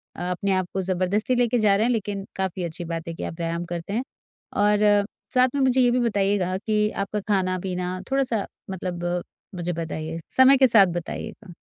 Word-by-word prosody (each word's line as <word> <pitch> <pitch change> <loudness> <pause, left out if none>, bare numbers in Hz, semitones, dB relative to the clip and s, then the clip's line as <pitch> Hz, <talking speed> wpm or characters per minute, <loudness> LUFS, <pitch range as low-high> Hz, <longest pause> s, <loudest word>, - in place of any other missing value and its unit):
अ, - - -8
अपने 195 +2 -1
आप 185 -1 0
को 190 - 0
जबरदस्ती 190 +6 0
लेके 245 0 +2
जा 210 -2 +4
रहे 215 +3 +2
हैं 245 - +2
लेकिन 205 -4 -2
काफ़ी 190 -1 -2
अच्छी 170 0 -5
बात 165 +1 -5
है 165 - -4
कि - - -7
आप - - -4
व्यायाम 170 0 -2
करते 170 +3 -5
हैं। 235 +4 0 0.6
और 205 0 +4 0.3
साथ 255 0 +5
में 280 - +1
मुझे 260 -1 +3
ये 245 -1 +4
भी 250 - +2
बताइएगा 200 -5 +1
कि 210 +1 +1
आपका 210 +1 -3
खाना-पीना 185 -2 -1
थोड़ा-सा 255 -6 +1 0.3
मतलब 180 -2 -4 0.5
मुझे 175 0 -2
बताइए, 165 0 -4
समय 260 +1 +6
के 265 0 +6
साथ 215 -4 +7 0.2
बताइएगा। 210 +1 -8
195 Hz, 190 wpm, -24 LUFS, 180-225 Hz, 0.6 s, साथ